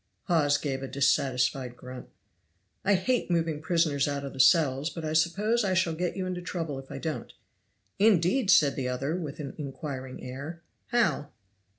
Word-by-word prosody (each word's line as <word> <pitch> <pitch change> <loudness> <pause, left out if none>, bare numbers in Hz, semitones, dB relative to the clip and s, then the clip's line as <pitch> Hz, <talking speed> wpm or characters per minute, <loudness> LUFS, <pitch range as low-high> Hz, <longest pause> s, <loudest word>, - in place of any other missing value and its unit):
Hawes 150 -5 +3
gave 135 -3 -3
a 135 - -4
dissatisfied 130 -2 +1
grunt. 125 0 -9 0.7
"I 200 +1 +4
hate 230 +5 0
moving 165 -3 0
prisoners 160 -4 +1
out 140 -1 -2
of 140 - -6
the 135 - -10
cells; 135 +1 +4
but 165 -2 -6
I 155 - -2
suppose 200 +9 +2
I 190 -2 +1
shall 185 -3 +2
get 175 +3 -2
you 190 - -2
into 180 -1 -3
trouble 165 -6 -4
if 135 - -12
I - - -6
don't." 160 -2 -4 0.7
"Indeed!" 205 +3 +3
said 145 -6 +5
the 130 -2 -2
other, 135 +5 -2
with 160 -6 -5
an 140 -3 -5
inquiring 135 -2 -6
air; 145 +7 -7 0.2
"how?" 230 - +1
155 Hz, 175 wpm, -28 LUFS, 135-175 Hz, 0.7 s, said